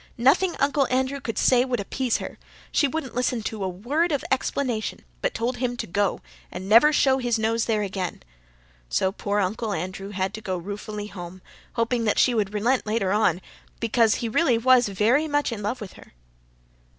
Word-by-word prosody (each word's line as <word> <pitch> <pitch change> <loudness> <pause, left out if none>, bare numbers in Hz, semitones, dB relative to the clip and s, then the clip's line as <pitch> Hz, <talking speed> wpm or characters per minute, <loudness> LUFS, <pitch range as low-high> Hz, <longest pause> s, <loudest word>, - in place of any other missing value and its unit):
Nothing 280 +9 +3
Uncle 280 -1 +2
Andrew 260 +2 0
could 225 -4 -4
say 250 -1 +4
would 255 -3 -1
appease 240 +4 -1
her. - - -8 0.3
She 290 - +3
wouldn't 275 -2 -4
listen 245 -2 -1
to 215 -2 -4
a 190 - -1
word 280 - 0
of 285 -3 -1
explanation, 255 -4 -1 0.2
but - - -1
told 245 +2 -1
him 245 0 -2
to - - -3
go, 200 +2 0 0.3
and 190 - -7
never 230 +9 +7
show 270 -3 +3
his 240 -2 0
nose 225 +1 0
there 215 -2 +1
again. 190 -2 -4 0.7
So 190 - +1
poor 205 +1 -2
Uncle 210 +3 -1
Andrew 190 +3 -5
had 190 -1 -2
to 220 - -7
go 185 -3 -3
ruefully 205 +3 -6
home, 185 -2 -9 0.3
hoping 230 0 0
that 210 - +1
she 250 - +4
would 210 -4 0
relent 225 +4 0
later 210 -3 0
on, 195 -4 +2 0.4
because 230 -1 +3
he 235 - -2
was 220 - -6
really 255 -8 +3 0.3
very 235 +11 +2
much 290 -3 0
in 220 -3 -5
love 210 +5 -2
with 210 -5 -8
her." - - -16
225 Hz, 190 wpm, -25 LUFS, 205-255 Hz, 0.7 s, never